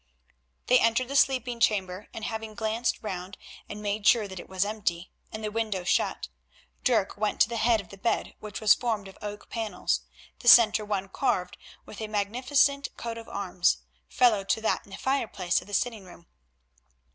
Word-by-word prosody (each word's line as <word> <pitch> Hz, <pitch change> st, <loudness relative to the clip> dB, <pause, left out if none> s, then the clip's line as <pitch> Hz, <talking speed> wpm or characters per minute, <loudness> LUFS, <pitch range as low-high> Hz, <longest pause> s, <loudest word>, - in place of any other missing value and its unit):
They 250 Hz, 0 st, +5 dB
entered 230 Hz, +2 st, +2 dB
the 275 Hz, -, -4 dB
sleeping 255 Hz, -3 st, +2 dB
chamber, 195 Hz, -3 st, 0 dB
and 220 Hz, -, -6 dB
having 220 Hz, -1 st, -5 dB
glanced 225 Hz, +2 st, -1 dB
round 185 Hz, -2 st, -5 dB, 0.3 s
and 210 Hz, 0 st, -7 dB
made 205 Hz, 0 st, -1 dB
sure 225 Hz, -4 st, +5 dB
that 190 Hz, -2 st, -8 dB
it -, -, -11 dB
was 190 Hz, +1 st, 0 dB
empty, 185 Hz, -5 st, -3 dB, 0.2 s
and 220 Hz, 0 st, -7 dB
the 210 Hz, -, -2 dB
window 215 Hz, -4 st, -2 dB
shut, 175 Hz, -, 0 dB, 0.6 s
Dirk 225 Hz, -7 st, +1 dB
went 210 Hz, 0 st, -1 dB
to -, -, +5 dB
the 235 Hz, -, -3 dB
head 225 Hz, 0 st, +3 dB
of 200 Hz, -, -9 dB
the 200 Hz, -, -12 dB
bed, 230 Hz, -, -1 dB
which 210 Hz, -2 st, -7 dB
was 215 Hz, -2 st, +6 dB
formed 220 Hz, -5 st, -2 dB
of 195 Hz, -, -13 dB
oak 210 Hz, 0 st, -7 dB
panels, 220 Hz, -5 st, -1 dB, 0.4 s
the 240 Hz, -, -8 dB
centre 220 Hz, -3 st, +8 dB
one 200 Hz, -2 st, -2 dB
carved 185 Hz, -4 st, -1 dB, 0.3 s
with 215 Hz, -, -10 dB
a 220 Hz, -, -3 dB
magnificent 255 Hz, +7 st, +1 dB
coat 230 Hz, -1 st, -5 dB
of 225 Hz, -, -12 dB
arms, 180 Hz, -3 st, +1 dB, 0.3 s
fellow 220 Hz, -5 st, +3 dB
to 195 Hz, -, 0 dB
that 220 Hz, -, 0 dB
in -, -, -19 dB
the 190 Hz, -, -8 dB
fireplace 205 Hz, -10 st, 0 dB
of -, -, -15 dB
the 205 Hz, -, -11 dB
sitting 225 Hz, -2 st, -1 dB
room. 175 Hz, -2 st, -15 dB
215 Hz, 190 wpm, -27 LUFS, 195-230 Hz, 0.6 s, centre